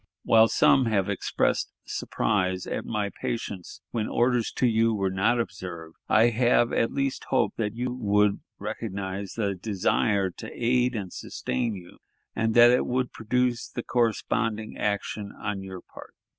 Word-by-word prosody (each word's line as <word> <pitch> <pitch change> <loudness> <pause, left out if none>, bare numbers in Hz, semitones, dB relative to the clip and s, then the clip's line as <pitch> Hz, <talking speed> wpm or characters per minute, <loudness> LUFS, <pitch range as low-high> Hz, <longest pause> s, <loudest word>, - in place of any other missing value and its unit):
While 115 0 +6
some 130 +3 +4
have 100 -3 +1
expressed 100 - 0
surprise 95 -3 -1
at - - -4
my 105 -3 -2
patience 100 -6 -4
when 110 -2 -1
orders 120 -1 +1
to - - +1
you 115 -1 +3
were 95 -2 0
not 105 +6 +2
observed, 90 -6 -6
I 115 +2 +5
have 120 0 +3
at 115 - +1
least 135 -1 -2
hoped 130 - +1
that 110 -1 -2
you 125 +1 -2
would 105 -4 +2 0.2
recognize 100 -2 -5
the 100 -3 -1
desire 100 0 0
to 110 +5 -9
aid 125 +1 +1
and 95 -4 -5
sustain 105 - -3
you, 90 -2 -12 0.4
and 115 0 0
that 120 0 +8
it 125 - +2
would 125 0 -1
produce 120 +1 0
the 120 - -5
corresponding 115 -2 0
action 100 0 -2
on 100 -1 -4
your 95 -2 -8
part. - - -14
110 Hz, 155 wpm, -26 LUFS, 100-120 Hz, 0.4 s, that